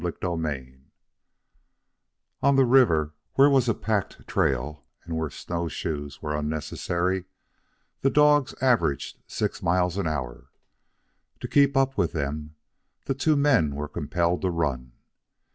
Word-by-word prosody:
CHAPTER 90 0 -2
IV 65 -4 -4 1.7
On 140 0 +4
the 135 -1 +5
river, 85 - +4 0.2
where 140 +1 +6
was 130 -3 +3
a 115 - +2
packed 105 -3 -3
trail 75 +4 -1 0.2
and 85 -1 -5
where 80 -1 -2
snowshoes 75 -5 -5
were 75 0 -2
unnecessary, 85 +4 -2 0.7
the 135 - +2
dogs 145 -1 +4
averaged 120 - +1
six - - -3
miles 90 +1 +1
an 100 -4 -1
hour. 65 -6 -4 0.9
To - - -4
keep 140 -1 +3
up 135 0 +1
with - - +1
them, 75 0 -4 0.5
the - - 0
two 150 +3 +2
men 135 - +3
were 75 +1 -4
compelled 85 +3 -1
to 95 - +1
run. 65 -8 -2
85 Hz, 130 wpm, -26 LUFS, -, 1.7 s, where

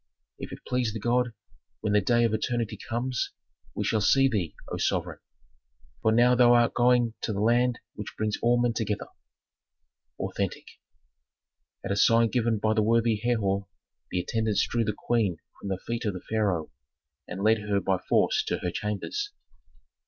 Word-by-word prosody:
"If - - -7
it - - -10
please 125 -4 0
the 110 - -4
god, 120 +2 +1 0.5
when 105 -1 0
the 105 - +4
day 120 +4 +3
of 115 -2 +2
eternity 115 0 -1
comes, 125 +2 -3 0.4
we - - -1
shall 110 -2 +1
see 135 +6 +5
thee, 95 - -2 0.2
O - - -2
sovereign! - - -1 0.8
For 110 - +3
now 120 +2 +5
thou 120 -1 +6
art 120 -1 +3
going 120 -2 +3
to - - -2
the 100 - -3
land 120 +3 +3 0.2
which 105 - -8
brings 110 -1 0
all 120 +1 +3
men 120 -1 +2
together." 110 -2 -2 1.1
Authentic. - - -3 1.2
At - - -2
a - - +1
sign 115 +3 +4
given 115 -2 +1
by 110 +1 +1
the 110 - +2
worthy 115 0 +2
Herhor, 100 -4 0 0.4
the 90 - -1
attendants 110 +3 0
drew 120 -1 0
the 105 -2 -2
queen 110 -8 0 0.2
from 100 - -6
the 95 - -1
feet 115 +4 -4
of 105 - 0
the 90 - -8
pharaoh, 100 -7 0 0.6
and 95 +2 -5
led 110 +1 +4
her 105 -1 0
by 95 -2 0
force - - +2
to - - -1
her 90 - -1
chambers. 105 - -3
110 Hz, 175 wpm, -27 LUFS, 105-120 Hz, 1.2 s, thou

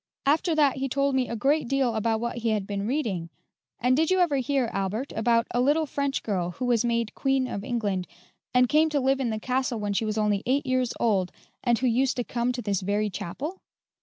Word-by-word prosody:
After 315 +4 +2
that 290 -4 +3
he 270 0 -2
told 275 +1 +1
me 260 -2 +1
a 235 - -3
great 280 +5 +1
deal 265 -2 +1
about 220 0 0
what 235 +1 -3
he 230 0 0
had 210 -3 0
been 200 0 -3
reading. 220 - -2 0.5
And 250 +1 +3
did 315 +3 +2
you 375 0 +3
ever 335 -6 +3
hear, 265 -1 0
Albert, 195 +7 -2
about 230 +1 +2
a 245 - +1
little 295 +5 +3
French 280 -1 -2
girl 185 -5 -1
who 250 - -4
was 240 -2 +2
made 235 -2 0
Queen 270 -1 +1
of 200 -5 -5
England, 205 -7 -2 0.4
and 250 0 +4
came 310 +4 +3
to 295 -2 +1
live 270 0 +2
in 255 -3 0
the 220 -1 -2
castle 255 0 -1
when 205 -1 -2
she 220 - 0
was 215 0 -2
only 210 -2 +1
eight 275 +3 +1
years 255 -2 +1
old, 195 -6 +1 0.3
and 240 -2 +3
who 255 - -1
used 255 +2 +2
to 245 - 0
come 240 +1 -1
to 245 -1 -5
this 200 -2 -1
very 205 +2 0
chapel?" 295 - -5
245 Hz, 230 wpm, -26 LUFS, 215-270 Hz, 0.5 s, and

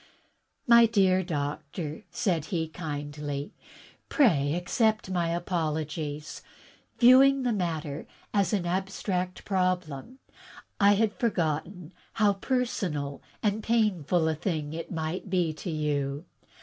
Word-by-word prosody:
"My 235 -1 +7
dear 190 -4 +3
doctor," 150 -1 -4
said 170 -6 0
he 165 -4 -2
kindly, 145 -3 -5 0.6
"pray 155 - +3
accept 215 +3 0
my 175 -2 0
apologies. 155 -3 -3 0.6
Viewing 265 +2 +6
the 245 -2 +1
matter 160 -6 -3 0.3
as 200 -4 +2
an 195 -4 0
abstract 185 0 -2
problem, 185 - -1 0.6
I 200 0 +6
had 210 +1 +2
forgotten 175 -4 -2 0.2
how 210 -2 +3
personal 195 - -2 0.2
and 210 0 +1
painful 185 -8 +1
a 160 - +2
thing 155 -2 -3
it 165 0 -6
might 165 +3 -3
be 175 -4 +1
to 175 - -7
you. 145 -1 -2
175 Hz, 110 wpm, -28 LUFS, 155-205 Hz, 0.6 s, My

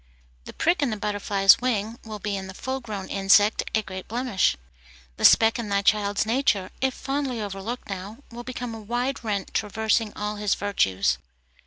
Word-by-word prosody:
The - - -9
prick 340 0 +1
in 285 - +2
the 215 - -3
butterfly's 205 0 +3
wing 230 -2 -1
will 215 -1 -7
be 205 0 -3
in 190 -1 -5
the 190 - -9
full 260 +4 -3
grown 210 -6 -6
insect 200 +2 +4
a 220 - +1
great 185 -1 -8
blemish. 235 -4 +1 0.6
The - - +1
speck 225 +1 +6
in 225 -3 -4
thy 200 0 +1
child's 205 0 +2
nature, 220 -5 +1
if 265 -1 +1
fondly 270 -3 -2
overlooked 205 +4 -5
now, 195 +2 -6
will 240 +1 -8
become 245 -1 -5
a 225 - -7
wide 245 +5 -2
rent 205 -3 -3
traversing 220 +1 0
all 210 0 -3
his 205 -1 +1
virtues. 95 - +1
210 Hz, 180 wpm, -25 LUFS, 200-240 Hz, 0.6 s, speck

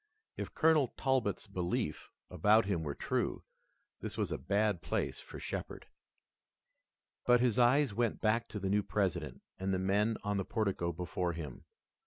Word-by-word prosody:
If - - -6
Colonel 155 -4 +4
Talbot's 130 -7 +1
beliefs 90 -6 -2 0.2
about 105 +5 +4
him 95 -4 0
were 75 -3 -3
true, - - -1 0.6
this - - -6
was - - -1
a - - -2
bad 100 -3 +1
place - - -2
for - - -9
Shepard. - - -5 1.4
But 125 0 +6
his 120 -2 +2
eyes 125 0 +4
went 115 +1 0
back 115 +2 +1
to 105 - -5
the 95 - -2
new 105 +1 +3
President 85 -11 -2 0.2
and 95 +1 -1
the 95 - +2
men 100 +4 +1
on 105 -1 0
the 95 - 0
portico 100 -5 -1
before 90 +1 -2
him. 75 -6 -7
100 Hz, 160 wpm, -33 LUFS, 90-115 Hz, 1.4 s, But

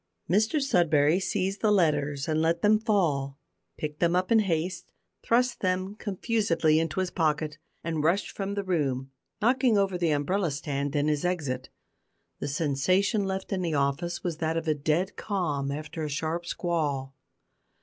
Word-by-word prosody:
Mr 215 - +2
Sudberry 170 - +3
seized 195 +1 -1
the 215 - +3
letters 145 -7 +1
and 155 0 +1
let 165 +4 +1
them 210 +1 +5
fall, 155 - 0 0.4
picked 150 -1 -5
them 170 0 +2
up 185 +4 0
in 225 - +6
haste, 175 -2 -1 0.3
thrust 245 +1 +2
them 185 +1 -1
confusedly 200 -6 +1
into 165 +3 -1
his 185 -1 -2
pocket, 155 -2 0 0.2
and 160 -3 -2
rushed 175 +6 +1
from 200 0 -4
the 200 - -1
room, 135 -8 -1 0.3
knocking 245 -1 +3
over 195 -2 +1
the 170 -2 +2
umbrella 165 +5 +1
stand 140 0 -3
in 145 +1 +2
his 150 -1 0
exit. 145 -8 -2 0.7
The - - -3
sensation 175 +8 +1
left 190 +1 -3
in 190 - -1
the 165 -3 -1
office 145 +5 -1
was 170 -3 -2
that 160 0 -1
of 165 0 -3
a 155 - +4
dead 155 +6 0
calm 155 -10 -1
after 155 +2 -5
a 150 - -2
sharp 160 +4 -2
squall. 145 -7 -2
165 Hz, 165 wpm, -27 LUFS, 150-190 Hz, 0.7 s, in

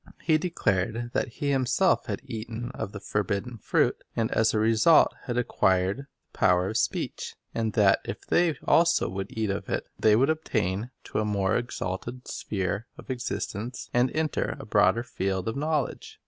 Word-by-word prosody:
He 160 - +2
Faith 155 - +4
declared 120 - -1
that - - +1
he 140 +4 -2
himself 135 +7 +2
had - - -3
eaten 115 -1 -5
of 110 -5 -5
the 100 - -7
forbidden 105 +4 -2
fruit, - - +1
and 115 -1 0
as 110 - +3
a - - 0
result 115 +8 +5
had 120 -2 -2
acquired 95 -4 +2
the 140 - -8 0.3
power 90 +1 +3
of 110 - -1
speech; - - -2 0.2
and 110 -2 -1
that 100 -3 +5
if - - -6
they 170 -3 +2
also 170 +1 +4
would 95 +1 -4
eat 110 -2 -1
of 100 - -4
it, - - -1
they 110 -1 +5
would 135 +7 +4
attain 110 -8 -1
to - - -3
a - - +1
more 100 -1 +1
exalted 120 +1 -4
sphere 100 +2 -3
of - - -7
existence, 120 -1 -4
and 120 +1 +3
enter 155 -1 -1
a - - -8
broader 95 +6 +3
field 95 -5 -2
of 115 - -1
knowledge. 150 0 -2
115 Hz, 175 wpm, -27 LUFS, 100-130 Hz, 0.3 s, result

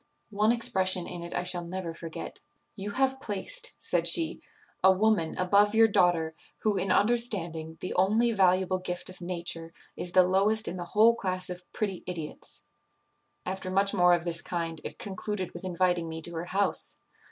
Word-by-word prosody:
One 210 +2 +3
expression 185 -6 +1
in 175 -1 -6
it 170 0 -7
I 175 - 0
shall 180 -1 -1
never 175 -1 -5
forget. 165 -1 -7 0.4
'You 200 0 -5
have 265 +4 0
placed,' - - -3
said - - 0
she, 335 -1 +1 0.4
'a 190 - +8
woman 190 -4 +1
above 205 +3 +3
your 225 0 +7
daughter, 175 -6 +2 0.3
who, 215 -2 +1
in 195 -1 0
understanding, 185 -9 +1
the 185 - -3
only 215 +6 +3
valuable 185 -2 +2
gift 180 0 -5
of 185 - -14
nature, 170 -2 -3 0.3
is 175 - -2
the 185 - +7
lowest 210 +4 +3
in - - -3
the 175 - -5
whole 225 +2 +7
class 185 -4 -2
of 180 0 -7
pretty 200 -4 -3
idiots.' 165 -4 -6 0.8
After 185 0 -4
much 195 +2 +2
more 180 -2 +5
of 170 - -4
this 170 -1 0
kind, 165 -2 -4
it - - -7
concluded 195 -1 -4
with - - -9
inviting 180 -2 0
me 160 0 -5
to 170 - -2
her 165 +1 -4
house. 195 +3 +1
185 Hz, 175 wpm, -28 LUFS, 175-205 Hz, 0.8 s, a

